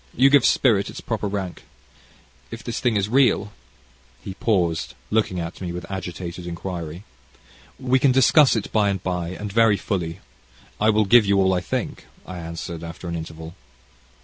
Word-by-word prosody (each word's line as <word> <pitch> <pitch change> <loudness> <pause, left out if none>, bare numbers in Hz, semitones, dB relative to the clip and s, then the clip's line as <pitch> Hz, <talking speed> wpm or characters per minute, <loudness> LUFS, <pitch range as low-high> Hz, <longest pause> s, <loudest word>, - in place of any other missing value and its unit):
You 135 +3 +5
give 140 -3 +6
spirit 105 -7 +3
its - - -8
proper 110 -3 -3
rank. 95 -3 -4 0.9
If - - -8
this 115 - -4
thing 120 -3 +1
is 100 -1 +1
real 110 -4 +2 0.3
" 65 +1 -32
He 95 - -5
paused 90 -7 0 0.2
looking 105 -4 +1
at 85 +2 -6
me 90 -2 -4
with 90 +1 -6
agitated 90 -2 -6
inquiry. 85 0 -6 0.8
"We 130 0 +2
can 135 0 +4
discuss 130 +2 +5
it 110 - -3
by 105 -2 +2
and 95 -1 -3
by, 90 -2 -2
and 100 +2 -6
very 115 -2 +4
fully. 90 -3 -3 0.6
I 110 - +3
will 110 0 +3
give 110 +1 +6
you 100 0 +3
all 95 -1 +3
I 90 - 0
think," - - -4 0.2
I 90 -1 -7
answered, 85 0 -6
after 85 +2 -8
an 85 - -3
interval. 80 0 -7
95 Hz, 175 wpm, -23 LUFS, 85-110 Hz, 0.9 s, give